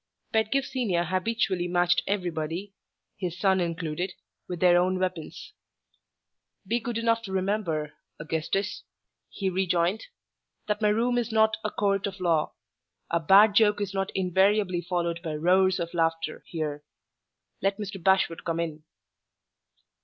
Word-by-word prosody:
Pedgift 220 +5 +1
Senior 215 -10 0
habitually 185 0 0
matched 175 0 +2
everybody 180 0 -3 0.4
his 180 -2 -4
son 190 -1 +3
included 170 +1 -2 0.4
with 180 -2 -4
their 180 0 +5
own 185 +1 +2
weapons. 180 - -4 1.1
"Be 230 +5 0
good 235 0 -4
enough 230 0 +1
to 205 -4 -8
remember, 185 -6 -1 0.3
Augustus," 165 +6 -2 0.5
he 195 - -3
rejoined, 185 - 0 0.6
"that 210 0 -1
my 210 - +4
Room 240 +3 +2
is 235 -1 -3
not 220 0 +3
a 215 - 0
Court 200 -1 0
of 190 -1 -7
Law. 165 -4 +1 0.6
A 170 - +2
bad 200 +6 +6
joke 210 -1 +4
is 200 -2 -3
not 195 0 -1
invariably 190 0 +2
followed 170 -1 -2
by 160 -3 -4
'roars 185 +4 +3
of 170 0 -4
laughter' 165 -2 -1
here. 150 -3 -4 0.8
Let 195 +1 +1
Mr. 200 -4 -6
Bashwood 190 -3 +2
come 165 -1 -2
in." 160 -2 -4
185 Hz, 140 wpm, -27 LUFS, 170-205 Hz, 1.1 s, bad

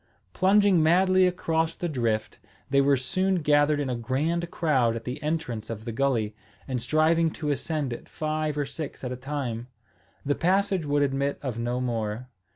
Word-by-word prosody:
Plunging 195 -1 +4
madly 185 +3 +4
across 165 -2 0
the 175 - -3
drift, 115 -7 -1 0.3
they 140 0 +5
were 140 0 +4
soon 185 +9 0
gathered 145 0 +3
in 145 - -1
a 125 - -1
grand 150 +9 -1
crowd 130 -10 +1
at 115 - -5
the 125 +5 -5
entrance 150 -8 -3
of 110 -1 -6
the 115 - -3
gulley, 115 -4 0 0.3
and 130 -3 -2
striving 160 +5 +3
to 150 -1 -3
ascend 145 -1 -2
it - - -9
five 155 -1 -2
or 145 - 0
six 140 +1 -7
at 125 - -3
a - - -3
time. 125 -3 -4 0.6
The 145 - +2
passage 190 0 +1
would 145 0 +2
admit 140 0 0
of 125 -4 -3
no 120 +1 -1
more. 115 -1 -3
145 Hz, 175 wpm, -26 LUFS, 125-160 Hz, 0.6 s, they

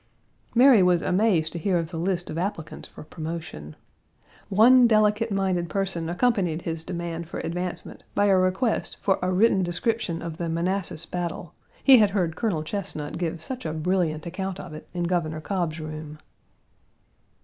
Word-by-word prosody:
Mary 245 -3 +7
was 180 -1 +3
amazed 180 -5 +2
to 170 - -4
hear 180 +2 +1
of 165 -1 -3
the 165 - -4
list 175 0 -1
of 155 - -5
applicants 175 -4 -4
for - - -11
promotion. 155 - -7 0.7
One 240 +5 +6
delicate 215 0 +3
minded 185 -3 0
person 180 -2 0
accompanied 180 -4 0
his 165 -1 -4
demand 170 -1 -5
for - - -5
advancement 180 +1 -5
by 205 - +3
a 195 -1 +4
request 185 +6 0
for 195 - +2
a 180 0 0
written 195 +1 +3
description 175 0 -1
of 165 -2 -6
the 170 -1 -3
Manassas 175 0 -2
battle; 175 -2 -5 0.3
he 265 -3 +8
had 210 -2 +5
heard 180 -5 -1
Colonel 185 -9 -1
Chesnut 165 -4 -5
give 165 -2 -3
such 255 +5 -5
a 155 - -3
brilliant 160 -1 -1
account 190 +2 -4
of 180 -4 -8
it 155 - -10
in 175 -1 -3
Governor 170 -3 -1
Cobb's 165 -2 -2
room. 155 -1 -7
175 Hz, 165 wpm, -25 LUFS, 165-195 Hz, 0.7 s, he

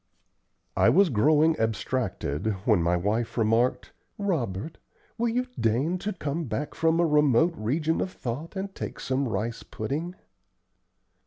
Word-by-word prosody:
I - - +5
was 190 -2 +4
growing 155 +7 +4
abstracted, 110 - -1
when 110 -7 +4
my 85 +1 +2
wife 110 +7 -1
remarked, 115 +2 +1 0.2
"Robert, 155 - -2 0.4
will 235 0 0
you 250 +2 0
deign 135 +11 +1
to 210 - -2
come 160 -3 -3
back 130 +5 -3
from 165 +1 +2
a 170 - +4
remote 150 +1 +4
region 155 +8 0
of - - -1
thought 140 - -5
and 195 0 -4
take - - -6
some 135 +1 -1
rice 115 +1 -3
pudding?" 155 +11 -4
140 Hz, 140 wpm, -27 LUFS, 115-165 Hz, 0.4 s, I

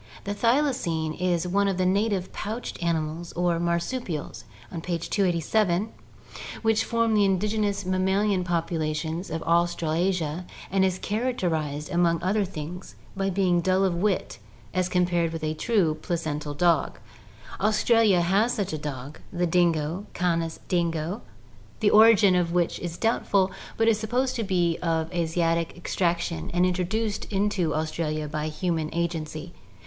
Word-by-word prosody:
The 200 - -3
thylacine 230 - +1
is 180 -1 +1
one 200 +3 +2
of 195 -2 0
the 185 - +1
native 195 0 0
pouched 220 0 -5
animals 165 0 -2
or 175 -1 +1
marsupials 170 - -2 0.4
(page 170 -1 -3
287) 190 +1 +1 0.7
which 225 0 +3
form 230 -1 +1
the 210 -1 +4
indigenous 200 +1 0
mammalian 190 +1 +1
population 165 -2 -1
of 160 0 -3
Australasia 170 0 0 0.2
and 195 0 +3
is 185 -1 +1
characterized 175 - -2
among 170 -1 +2
other 200 +3 +2
things 175 0 -7 0.2
by 195 0 0
being 180 -2 +2
dull 185 +2 +2
of 185 - +1
wit 185 +2 -1 0.3
as 185 -1 0
compared 175 -2 +1
with 165 -1 -5
a 155 0 0
true 180 -2 +1
placental 155 -4 -3
dog. 170 -1 +2 0.6
Aus 215 +2 +1
tralia 225 -6 +4
has 200 +8 +2
such 200 -6 -2
a 155 - -3
dog, 145 0 -6
the 175 0 0
dingo 170 +2 +1
(Canis 165 -2 0
dingo), 170 +2 -1 0.6
the 210 -3 +3
origin 215 -3 +7
of 175 -2 +1
which 175 -1 0
is 175 -1 -5
doubtful, 200 -4 +1 0.3
but 225 - +2
it - - +7
is 215 - 0
supposed 245 +4 0
to 230 - -1
be 175 -4 +1
of 165 0 -1
Asiatic 165 0 0
extraction 170 -1 -1
and 180 +1 +4
intro 180 0 0
duced 215 +2 -2
into 195 -5 0
Australia 155 -1 -2
by 150 +1 -3
human 160 0 -2
agency. 165 -1 -3
175 Hz, 145 wpm, -26 LUFS, 165-200 Hz, 0.7 s, origin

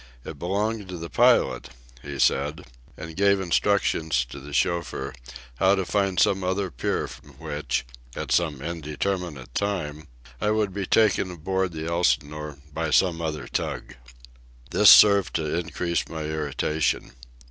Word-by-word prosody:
It 75 -3 -8
belonged 100 +3 -2
to 90 - -5
the 85 0 -7
pilot, - - +3 0.3
he 70 +1 -7
said, 70 +4 +1 0.3
and 80 0 -8
gave 100 0 +3
instructions 85 -7 +1
to 70 - -7
the 70 +2 -11
chauffeur 85 -4 -1 0.4
how 95 +8 +4
to 95 -1 -2
find 95 -1 0
some 95 -2 +3
other 95 0 -1
pier - - -2
from - - -13
which, 70 -4 -3 0.3
at - - -5
some 75 -6 +1
indeterminate 80 -4 -4
time, 80 -7 -3 0.3
I - - 0
should 105 -2 +1
be 100 -1 -3
taken 105 -4 +3
aboard 95 +1 -2
the 80 0 -5
Elsinore 75 -2 -1 0.2
by 80 +1 -2
some 85 +1 +2
other 80 -2 -4
tug. - - -4 0.8
This 105 - +7
served 100 -3 +7
to 80 -2 -1
increase 85 0 -2
my 80 -1 -5
irritation. 75 0 -1
85 Hz, 145 wpm, -25 LUFS, 75-95 Hz, 0.8 s, This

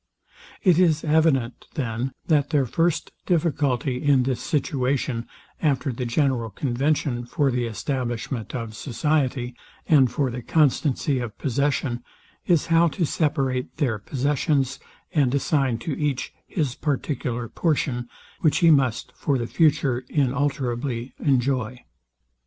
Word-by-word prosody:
It 180 -4 +5
is 165 -4 +3
evident, 150 -6 +2
then, 125 -1 -2
that 145 -3 +2
their 145 -4 +2
first 165 +7 0 0.2
difficulty, 140 -7 +1
in 140 -3 +4
this 125 -1 -1
situation, 130 -4 -1 0.3
after 145 -2 +1
the 125 +1 -3
general 125 -2 +1
convention 130 +2 0
for 145 -1 +1
the 125 -1 0
establishment 120 -1 -3
of 115 -3 -5
society, 130 0 -1 0.3
and 135 -6 +5
for 130 0 0
the 125 +1 -5
constancy 145 -1 +2
of 115 -4 -5
possession, 135 -2 -1 0.4
is, 170 -5 +3
how 165 +1 +4
to 165 +3 -1
separate 135 -5 -1
their 125 -9 0
possessions, 140 +3 0 0.3
and 140 -4 +2
assign 135 -3 +1
to 140 +5 -4
each 145 -3 -1
his 145 -8 -1
particular 125 -4 -2
portion, 125 -5 -1 0.3
which 155 - +3
he 165 -1 +6
must 130 -6 +2
for 140 -2 0
the 120 - -2
future 140 -4 +2
inalterably 130 -3 -1
enjoy. 125 -3 0
135 Hz, 125 wpm, -24 LUFS, 125-150 Hz, 0.4 s, he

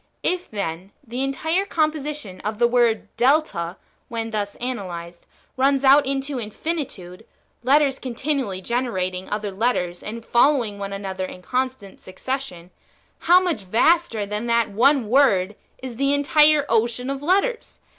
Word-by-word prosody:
If, 360 0 -1
then, 190 -2 -5
the 245 +3 -4
entire 320 +7 0
composition 300 - -2
of 215 +1 -3
the 235 +1 +4
word 235 -2 +2
Delta 240 - +1 0.3
[when 225 -1 -4
thus 205 -2 -3
analyzed] 175 -8 -6 0.3
runs 275 +1 +2
out 275 +1 +6
into 275 0 -2
infinitude, 215 - -5 0.4
letters 275 +1 +3
continually 255 -6 -2
generating 190 -6 -2
other 210 -1 -3
letters, 190 -4 -1
and 230 +2 -7
following 240 -5 +2
one 200 0 -5
an 200 0 -6
other 190 -1 -3
in 180 0 -10
constant 255 -4 -3
succession, 185 -3 -6 0.5
how 355 +2 +6
much 350 - -1
vaster 230 - +2
than 210 +3 -4
that 235 -2 +2
[one] 255 +3 +3
word 210 -7 +3 0.3
is 250 -3 -6
the 275 +2 +2
[entire] 300 0 +4
ocean 235 +3 0
of 275 0 -4
letters 400 +9 0
240 Hz, 140 wpm, -22 LUFS, 200-280 Hz, 0.5 s, out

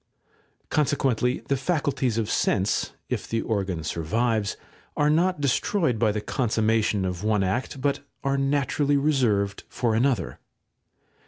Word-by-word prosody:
Consequently 130 -4 +1
the 140 - +2
faculties 135 -5 0
of 110 -2 0
sense, 100 -2 0
if - - -3
the 115 0 -1
organ 95 -7 -2
survives, 105 +7 -1 0.4
are 150 0 +3
not 180 +2 +2
destroyed 140 - +1
by 110 -2 +3
the 105 0 -2
consummation 110 -4 +1
of 90 0 -3
one 105 -2 +2
act, 120 +8 -2
but 140 +1 0 0.2
are 135 0 +1
naturally 140 +1 +1
reserved 120 -9 +1
for 120 -3 0
another. 125 +3 0
120 Hz, 130 wpm, -25 LUFS, 105-140 Hz, 0.4 s, are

